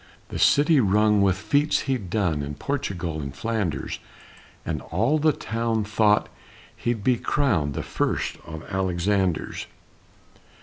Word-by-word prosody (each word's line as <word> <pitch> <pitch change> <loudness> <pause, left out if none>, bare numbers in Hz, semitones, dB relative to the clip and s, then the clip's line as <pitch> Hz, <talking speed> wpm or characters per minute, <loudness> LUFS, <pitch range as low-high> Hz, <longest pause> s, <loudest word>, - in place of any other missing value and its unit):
The - - -5
city 145 +1 +5
rung 105 -1 +4
with 95 -1 +3
feats 140 +10 +1
he'd 125 -9 -2
done 85 -9 0
In 70 0 -5
Portugal 90 - -3
and 70 -1 -6
Flanders, 110 -6 -2 0.7
And - - -2
all 140 +8 +1
the 155 +1 +4
town 115 -5 -1
thought 105 0 +3 0.5
he'd 120 -3 -2
be 125 +1 +3
crowned 100 - +1
The - - -2
first - - -1
of 80 -2 -8
Alexanders. 95 -1 0
105 Hz, 130 wpm, -25 LUFS, 90-120 Hz, 0.7 s, city